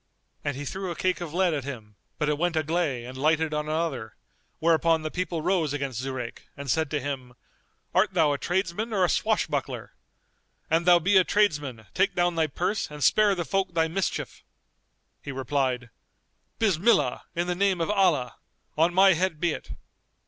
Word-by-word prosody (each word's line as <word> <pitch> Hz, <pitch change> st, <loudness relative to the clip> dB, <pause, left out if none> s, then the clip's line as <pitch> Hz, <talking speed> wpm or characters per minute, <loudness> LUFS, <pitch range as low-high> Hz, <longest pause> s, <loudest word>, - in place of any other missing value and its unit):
And 145 Hz, -2 st, -2 dB
he 145 Hz, -, -5 dB
threw 190 Hz, +5 st, -4 dB
a 170 Hz, -, -4 dB
cake 185 Hz, +1 st, 0 dB
of 170 Hz, -3 st, -5 dB
lead 180 Hz, 0 st, +2 dB
at 145 Hz, -3 st, -2 dB
him, 115 Hz, -6 st, -8 dB, 0.2 s
but 150 Hz, -, 0 dB
it 150 Hz, -1 st, 0 dB
went 175 Hz, -1 st, 0 dB
agley 155 Hz, -5 st, 0 dB
and 125 Hz, +1 st, -8 dB
lighted 155 Hz, +3 st, +1 dB
on 150 Hz, 0 st, -2 dB
another; 155 Hz, -, -2 dB, 0.4 s
whereupon 165 Hz, 0 st, +2 dB
the 155 Hz, -, -3 dB
people 175 Hz, -3 st, -3 dB
rose 170 Hz, -5 st, +1 dB
against 135 Hz, -4 st, -3 dB
Zurayk 130 Hz, -3 st, -6 dB
and 140 Hz, -2 st, -3 dB
said 160 Hz, +3 st, +1 dB
to 150 Hz, -, -1 dB
him, 130 Hz, -3 st, -5 dB, 0.6 s
"Art 190 Hz, -, +2 dB
thou 155 Hz, -4 st, +4 dB
a 140 Hz, -, -3 dB
tradesman 190 Hz, +5 st, -1 dB
or 190 Hz, -3 st, +3 dB
a -, -, 0 dB
swashbuckler? 220 Hz, -1 st, -1 dB, 0.8 s
An 165 Hz, +1 st, +2 dB
thou 175 Hz, -1 st, +7 dB
be 185 Hz, +4 st, +3 dB
a 185 Hz, -, +6 dB
tradesman, 145 Hz, -, 0 dB
take 195 Hz, -, +1 dB
down 175 Hz, 0 st, +2 dB
thy 160 Hz, -1 st, +1 dB
purse 180 Hz, +8 st, -2 dB
and 150 Hz, -1 st, -6 dB
spare 205 Hz, -, +4 dB
the 175 Hz, -2 st, -3 dB
folk 190 Hz, -2 st, -1 dB
thy 160 Hz, -1 st, +3 dB
mischief." 185 Hz, +4 st, -3 dB, 0.8 s
He 140 Hz, -, -6 dB
replied, 130 Hz, -2 st, -1 dB, 0.7 s
"Bismillah, 185 Hz, -, +2 dB
in 170 Hz, +1 st, 0 dB
the 180 Hz, -, -1 dB
name 190 Hz, 0 st, +1 dB
of 165 Hz, +5 st, 0 dB
Allah! 175 Hz, -12 st, +2 dB, 0.4 s
On 165 Hz, +3 st, +2 dB
my 190 Hz, 0 st, +7 dB
head 180 Hz, -2 st, -1 dB
be 175 Hz, 0 st, +1 dB
it." -, -, -7 dB
160 Hz, 185 wpm, -26 LUFS, 140-180 Hz, 0.8 s, thou